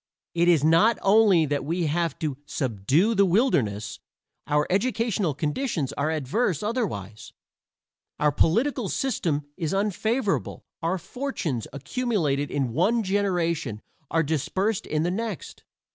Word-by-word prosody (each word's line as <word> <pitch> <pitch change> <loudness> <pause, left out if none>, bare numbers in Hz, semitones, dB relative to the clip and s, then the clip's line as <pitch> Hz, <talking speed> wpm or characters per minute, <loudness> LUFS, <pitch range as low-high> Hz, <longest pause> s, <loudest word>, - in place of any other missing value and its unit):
It 170 0 +2
is 165 -5 +4
not 165 +9 +5
only 195 -5 +5
that 145 -2 -1
we 165 +4 -1
have 165 +2 0
had - - -38
to 150 -5 -2
"subdue 135 - +1
the 200 -2 +4
wilderness"; 120 - +1 0.5
our 150 0 +2
educational 205 - 0
conditions 150 - -2
are 145 +2 -1
adverse 160 - 0
otherwise. 135 - -3 0.9
Our 150 0 +3
political 230 - +1
system 165 - -1
is 165 +1 -2
unfavorable. 210 +3 -1 0.2
Our 170 +3 0
fortunes, 180 - -4
accumulated 145 - -1
in 135 -5 -1
one 230 - +2
generation, 175 - 0 0.3
are 165 0 +2
dispersed 185 - -1
in 155 0 0
the 175 - 0
next. 215 -1 -5
170 Hz, 130 wpm, -25 LUFS, 145-210 Hz, 0.9 s, not